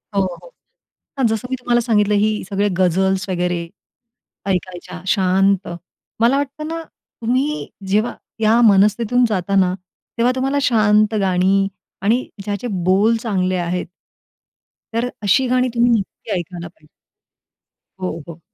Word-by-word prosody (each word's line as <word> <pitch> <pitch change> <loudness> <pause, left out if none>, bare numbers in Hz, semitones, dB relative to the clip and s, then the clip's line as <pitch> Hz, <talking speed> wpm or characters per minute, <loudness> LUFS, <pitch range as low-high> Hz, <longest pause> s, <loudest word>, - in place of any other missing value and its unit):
हो, 200 - +3 0.2
हो. - - -15 0.7
हां, 265 - +3
जसं 225 +2 -1
मी 260 - 0
तुम्हाला 240 -1 +2
सांगितलं, 210 -3 +2
ही 210 +1 +1
सगळे 200 +1 +1
गझल्स 190 +2 +1
वगैरे 180 -1 -1 0.9
ऐकायच्या, 180 -1 -3
शांत. 195 0 +2 0.5
मला 240 +4 +4
वाटतं 285 +2 -3
ना, 330 +1 -4 0.4
तुम्ही 260 +6 0 0.2
जेव्हा 215 +5 +1 0.2
या 220 +1 +4
मनस्थितीतून 210 +5 +3
जाता 195 -1 -1
ना, 185 -2 +3 0.4
तेव्हा 235 +2 +3
तुम्हाला 270 +2 0
शांत 215 -3 +3
गाणी 190 +1 +2 0.3
आणि 225 +6 +1 0.2
ज्याचे 205 +4 -3 0.2
बोल 200 +5 +4
चांगले 190 -5 -1
आहेत, 175 0 -2 1.1
तर 235 +2 0
अशी 255 +6 +3
गाणी 255 +1 +2
तुम्ही 235 +1 +4
नक्की 220 0 -2
ऐकायला 175 0 -7
पाहिजे. 160 -2 -21 1.1
हो, 175 -3 -3
हो. 170 -1 -9
205 Hz, 130 wpm, -19 LUFS, 185-240 Hz, 1.1 s, मला